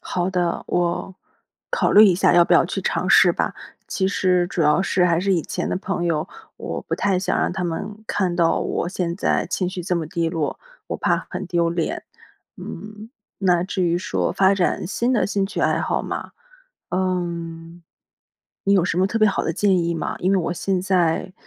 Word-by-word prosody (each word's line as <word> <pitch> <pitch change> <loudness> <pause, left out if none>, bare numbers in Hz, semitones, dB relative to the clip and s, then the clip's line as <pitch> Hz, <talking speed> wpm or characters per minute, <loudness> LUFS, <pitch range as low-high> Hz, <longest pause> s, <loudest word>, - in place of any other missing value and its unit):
好 180 0 -2
的， 175 -2 -1
我 175 +2 -1 0.6
考 - - +1
虑 210 +2 +9
一 190 -4 +5
下 180 - +3
要 175 - +7
不 - - 0
要 - - +6
去 - - -3
尝 - - -1
试 - - +6
吧。 - - -2 0.3
其 190 - -1
实 180 -2 +2
主 170 - -1
要 150 +5 +3
是 185 -2 +2
还 170 -2 +3
是 195 +1 +1
以 170 -4 +1
前 - - -3
的 - - -1
朋 190 -2 -3
友， 160 -2 -1 0.3
我 - - -5
不 - - -3
太 195 -2 +1
想 185 - -1
让 - - 0
他 190 - -3
们 205 +6 -5
看 185 -3 0
到 170 -2 +2
我 - - -2
现 175 -2 -2
在 - - 0
情 180 -2 -1
绪 185 -1 -5
这 180 +1 -1
么 165 -3 -2
低 165 +1 -1
落， 160 -3 -2 0.3
我 - - -3
怕 - - 0
很 195 - -5
丢 170 -1 +1
脸。 170 -1 -2 0.5
嗯， 210 +4 -9 0.3
那 180 -3 +2
至 190 0 -2
于 170 -1 +2
说 180 - -1
发 195 0 +4
展 185 -2 0
新 240 +6 0
的 230 - +2
兴 200 -1 0
趣 195 - -4
爱 - - +2
好 - - -1
嘛。 - - -5 0.6
嗯， 170 -2 -3 0.8
你 200 - +3
有 185 - +3
什 175 - -1
么 190 - +3
特 225 - -1
别 215 -1 +5
好 - - -1
的 165 - -1
建 195 +1 +2
议 170 - 0
吗？ 165 - -3
因 185 - +1
为 195 - +4
我 170 - -1
现 185 +1 -1
在 185 -1 +1
180 Hz, 225 characters per minute, -22 LUFS, 170-195 Hz, 0.8 s, 虑